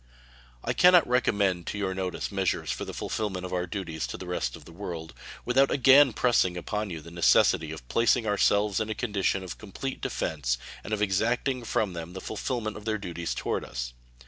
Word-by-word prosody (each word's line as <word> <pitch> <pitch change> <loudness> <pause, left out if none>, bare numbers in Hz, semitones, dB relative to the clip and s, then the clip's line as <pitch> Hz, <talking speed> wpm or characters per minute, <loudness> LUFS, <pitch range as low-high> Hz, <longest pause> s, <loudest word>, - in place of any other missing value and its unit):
I - - 0
can 180 0 +6
not 175 - +6
recommend 100 -8 +1
to - - -3
your 95 -2 -1
notice 95 +1 -3
measures 95 -2 0
for - - -3
the - - -6
fulfillment 95 -4 -3
of 90 - -6
our 90 0 -1
duties 85 -5 -4
to - - -6
the 95 - -8
rest 90 0 -2
of - - -13
the - - -12
world 85 -3 -6 0.3
without 135 +3 +4
again 135 +1 +6
pressing 105 -7 +2
upon 105 +4 -3
you 80 -3 -6
the 85 +2 -12
necessity 85 -1 +4
of - - -9
placing 115 - +2
ourselves 105 -1 +2
in 110 -1 -2
a 110 - -2
condition 100 -4 0
of 90 - -7
complete 110 +6 -6
defense 65 -6 -1 0.3
and - - -8
of 105 -1 +1
exacting 120 +6 0
from 105 -4 0
them 85 +1 -7
the 95 - -6
fulfillment 110 +1 -3
of 105 - -11
their 110 -1 0
duties 85 -4 -4
toward - - -2
us. - - -5
100 Hz, 200 wpm, -28 LUFS, 90-110 Hz, 0.3 s, can